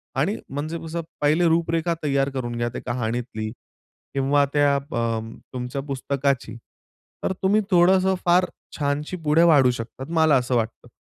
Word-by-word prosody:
आणि 165 Hz, +11 st, +1 dB
म्हणजे 150 Hz, +4 st, -4 dB
कसं, 170 Hz, +1 st, -3 dB, 0.2 s
पहिले 155 Hz, +4 st, +3 dB
रूपरेखा 165 Hz, 0 st, +1 dB
तैयार 140 Hz, -1 st, +1 dB
करून 120 Hz, -3 st, -4 dB
घ्या 120 Hz, 0 st, 0 dB
त्या -, -, -7 dB
कहाणीतली 120 Hz, -2 st, -3 dB, 0.6 s
किंवा 140 Hz, +1 st, +3 dB
त्या 145 Hz, -1 st, +4 dB
प -, -, -3 dB
अ, 115 Hz, -1 st, 0 dB, 0.3 s
तुमच्या 125 Hz, +2 st, -4 dB
पुस्तकाची, 135 Hz, -3 st, -1 dB, 0.7 s
तर 190 Hz, -, 0 dB
तुम्ही 205 Hz, +3 st, +4 dB
थोडंसं 185 Hz, +2 st, +4 dB
फार 180 Hz, +1 st, +5 dB, 0.3 s
छानशी 150 Hz, +4 st, -2 dB
पुढे 150 Hz, +3 st, +5 dB
वाढू 140 Hz, -7 st, +6 dB
शकतात. 120 Hz, +3 st, -6 dB
मला 160 Hz, -3 st, +4 dB
असं 125 Hz, 0 st, 0 dB
वाटतं. 115 Hz, +1 st, -2 dB
140 Hz, 145 wpm, -23 LUFS, 125-165 Hz, 0.7 s, वाढू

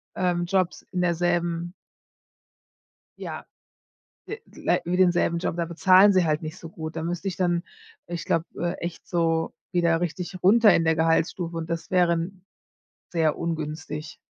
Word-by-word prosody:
ähm, 175 Hz, -1 st, 0 dB
Jobs 185 Hz, 0 st, 0 dB
in 180 Hz, -, -1 dB
derselben 175 Hz, 0 st, 0 dB, 1.5 s
Ja, -, -, -6 dB, 0.8 s
d 435 Hz, -, -6 dB, 0.2 s
lei -, -, +1 dB
wie 175 Hz, +1 st, 0 dB
denselben 175 Hz, -2 st, +3 dB
Job, 170 Hz, -, -2 dB
da 170 Hz, -, 0 dB
bezahlen 185 Hz, +4 st, +5 dB
sie 185 Hz, -1 st, +4 dB
halt 155 Hz, 0 st, 0 dB
nicht 155 Hz, +3 st, -6 dB
so 165 Hz, -, -9 dB
gut. 160 Hz, 0 st, -7 dB
Da 160 Hz, -, -3 dB
müsste 175 Hz, +3 st, -3 dB
ich 190 Hz, -, -3 dB
dann, 175 Hz, -2 st, +1 dB, 0.4 s
ich 175 Hz, -1 st, -5 dB
glaube, 165 Hz, 0 st, 0 dB
äh, 175 Hz, 0 st, -1 dB
echt 175 Hz, -, -7 dB
so 165 Hz, -2 st, 0 dB, 0.2 s
wieder 170 Hz, -2 st, +2 dB
richtig 175 Hz, +2 st, -4 dB
runter 210 Hz, +1 st, +6 dB
in 165 Hz, -, +2 dB
der 160 Hz, 0 st, +2 dB
Gehaltsstufe 165 Hz, +1 st, 0 dB
und 160 Hz, -1 st, -4 dB
das 165 Hz, 0 st, -4 dB
wären 180 Hz, +1 st, +1 dB, 0.6 s
sehr 160 Hz, -3 st, +1 dB
ungünstig. 155 Hz, -1 st, -4 dB
170 Hz, 155 wpm, -25 LUFS, 165-180 Hz, 1.5 s, runter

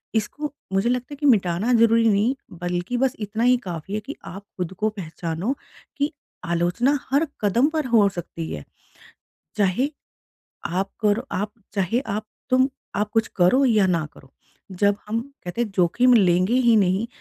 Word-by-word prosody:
इसको 290 Hz, +8 st, -2 dB, 0.2 s
मुझे 195 Hz, +5 st, +2 dB
लगता 250 Hz, +3 st, -2 dB
है -, -, -5 dB
कि 290 Hz, +1 st, -4 dB
मिटाना 210 Hz, -2 st, +3 dB
ज़रूरी 230 Hz, 0 st, +5 dB
नहीं 215 Hz, +6 st, +2 dB, 0.3 s
बल्कि 175 Hz, +7 st, -2 dB
बस 265 Hz, 0 st, +2 dB
इतना 215 Hz, +2 st, -2 dB
ही 250 Hz, +1 st, +5 dB
काफ़ी 175 Hz, +1 st, -6 dB
है 215 Hz, -, 0 dB
कि 285 Hz, -, -6 dB, 0.2 s
आप 195 Hz, +2 st, -9 dB
खुद 180 Hz, 0 st, -3 dB
को 215 Hz, -, +2 dB
पहचानो 165 Hz, -, -3 dB, 0.4 s
कि 290 Hz, +1 st, 0 dB, 0.3 s
आलोचना 175 Hz, +12 st, +1 dB
हर 295 Hz, +4 st, +3 dB
कदम 225 Hz, +6 st, +3 dB
पर 310 Hz, -3 st, -1 dB
हो 225 Hz, -4 st, +5 dB
सकती 170 Hz, -3 st, -6 dB
है। 75 Hz, -, -5 dB, 0.9 s
चाहे 205 Hz, +6 st, +2 dB, 0.8 s
आप 190 Hz, +3 st, -2 dB
करो 215 Hz, +4 st, +1 dB
आप 205 Hz, +2 st, -2 dB, 0.2 s
चाहे 200 Hz, +5 st, +1 dB
आप 215 Hz, -4 st, -4 dB, 0.2 s
तुम 260 Hz, +1 st, +4 dB, 0.3 s
आप 210 Hz, 0 st, 0 dB
कुछ 225 Hz, 0 st, +2 dB
करो 195 Hz, +10 st, +4 dB
या 215 Hz, -6 st, +4 dB
ना 170 Hz, -3 st, +1 dB
करो 135 Hz, -, -18 dB, 0.5 s
जब 200 Hz, 0 st, +4 dB
हम 225 Hz, +2 st, 0 dB, 0.2 s
कहते 180 Hz, +7 st, -4 dB
हैं 230 Hz, -, 0 dB
जोखिम 240 Hz, +8 st, +4 dB
लेंगे 185 Hz, 0 st, +4 dB
ही 240 Hz, -3 st, +4 dB
नहीं 195 Hz, +2 st, +2 dB
210 Hz, 165 wpm, -23 LUFS, 185-245 Hz, 0.9 s, ज़रूरी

